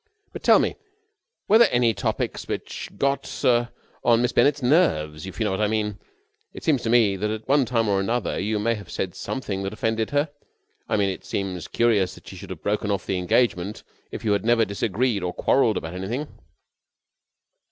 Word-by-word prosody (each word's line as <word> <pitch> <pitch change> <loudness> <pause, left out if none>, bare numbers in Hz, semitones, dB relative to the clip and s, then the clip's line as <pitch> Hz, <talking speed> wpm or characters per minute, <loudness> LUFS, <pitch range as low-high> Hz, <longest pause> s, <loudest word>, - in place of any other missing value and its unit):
But, - - -7
tell - - +6
me, - - 0 0.7
were 220 +3 +6
there 235 - +7
any 120 -2 +3
topics - - -3
which - - -5
got 140 +1 -1 0.6
on 115 -1 +4
Miss 125 - +1
Bennett's 145 -1 +3
nerves, 95 - +2
if 95 - -9
you - - +1
know 105 - 0
what 95 - -1
I 105 - +3
mean? 105 -1 -1 0.6
It - - -9
seems 145 -6 +2
to 115 - -2
me 115 -4 +4
that 105 +3 -1
at 110 0 -5
one 140 0 +4
time 115 -2 0
or 100 -1 +2
another 115 +4 -1
you 105 +3 -1
may 115 +3 +1
have 105 -3 -8
said 90 -2 -3
something 100 -7 -4
that 95 +1 -4
offended 110 0 -1
her. 145 +1 0 0.6
I - - +2
mean, 100 -1 +2
it - - -8
seems 95 -3 -4
curious 110 -6 +2
that - - -17
she - - -9
should 95 +1 -10
have 85 -5 -8
broken 105 0 -1
off 100 -3 -1
the 95 - -1
engagement 95 0 0 0.3
if - - -7
you 105 - +2
had 100 - +1
never 115 0 +3
disagreed 105 +2 -1
or 90 0 -3
quarrelled 115 -6 +2
about 80 +1 -5
anything." 115 +11 -3
110 Hz, 200 wpm, -24 LUFS, 95-120 Hz, 0.7 s, there